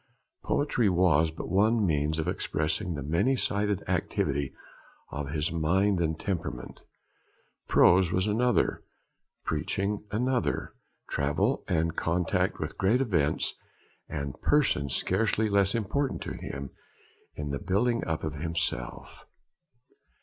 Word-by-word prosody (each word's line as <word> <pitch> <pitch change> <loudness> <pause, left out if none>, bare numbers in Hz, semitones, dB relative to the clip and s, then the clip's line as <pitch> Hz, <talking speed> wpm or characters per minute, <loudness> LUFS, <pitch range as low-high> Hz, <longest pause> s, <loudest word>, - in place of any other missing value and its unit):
Poetry 125 -7 +1
was 85 -3 +4
but 80 - -7
one 105 +4 +3
means 75 -2 +1
of 80 - -2
expressing 80 +4 -1
the 70 - -4
many 85 - +2
sided 105 -4 0
activity 70 -2 0 0.6
of 75 -1 -4
his 75 +1 -1
mind 90 +4 +2
and 80 -1 0
temperament. 80 -10 -4 0.9
Prose 90 -1 +5
was 95 +1 +1
another, 120 +3 +1 0.6
preaching 100 +2 -1
another; 125 +4 0 0.3
travel 80 - 0
and 85 -3 0
contact 85 0 0
with - - -5
great 105 +6 +3
events 85 - +1 0.6
and 70 -1 -5
persons 75 - +2
scarcely 110 +3 +1
less 100 0 +3
important 130 +6 -1
to - - -5
him, 70 -1 -6 0.6
in 75 -1 -4
the 70 - -2
building 115 +5 +1
up 80 -1 -2
of 80 -1 -2
himself. 80 -5 -3
90 Hz, 120 wpm, -28 LUFS, 75-105 Hz, 0.9 s, Prose